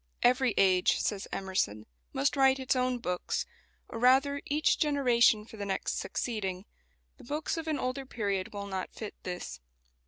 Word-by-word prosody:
"Every 250 -2 +3
age," 185 -2 +4
says 200 -2 -2
Emerson, 185 - -1 0.3
"must 135 - +1
write 270 -1 +5
its 260 0 +1
own 255 0 +1
books; 180 -6 -2 0.4
or 225 - -6
rather, 270 +3 +4
each 300 +2 +2
generation 245 -7 +4
for 220 - -12
the 205 - -4
next 195 - -2
succeeding. 195 -5 -3 0.5
The 265 - -15
books 295 +5 -2
of 325 -1 -5
an 310 -2 0
older 255 +1 -3
period 200 -6 -2
will 200 -1 -5
not 190 -2 -4
fit 215 -2 -6
this." 180 - -6
235 Hz, 160 wpm, -30 LUFS, 195-265 Hz, 0.5 s, write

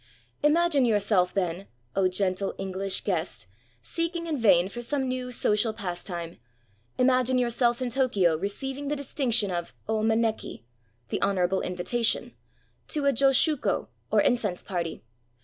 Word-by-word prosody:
Imagine 305 -1 +3
yourself, 205 -5 +2
then, 185 0 -2
— 120 0 -40
oh, 190 -1 +3
gentle 185 +1 0
EngUsh 195 0 -1
guest! 175 - -2 0.4
seeking 335 - -2
in 320 -2 -1
vain 195 -8 +4
for 240 +5 -7
some 265 +2 -1
new 255 0 -3
social 220 -1 +2
pastime 175 -4 -6 0.3
— 100 - -36 0.2
imagine 255 0 +3
yourself 240 0 +1
in 245 - -2
Tokyo 210 -10 +2
receiving 265 - -4
the 295 - 0
distinction 255 -7 0
of 175 -1 -4
0 220 0 0
maneki 220 - 0 0.2
— 115 +1 -41
the - - -2
honorable 190 -1 +1
invitation 215 +6 0 0.3
— - - -41
to 295 -3 -1
a 280 - +4
josshuko, 275 +3 +2 0.2
or - - +4
incense 210 -8 0
party. 170 -7 -4
220 Hz, 150 wpm, -27 LUFS, 185-255 Hz, 0.4 s, vain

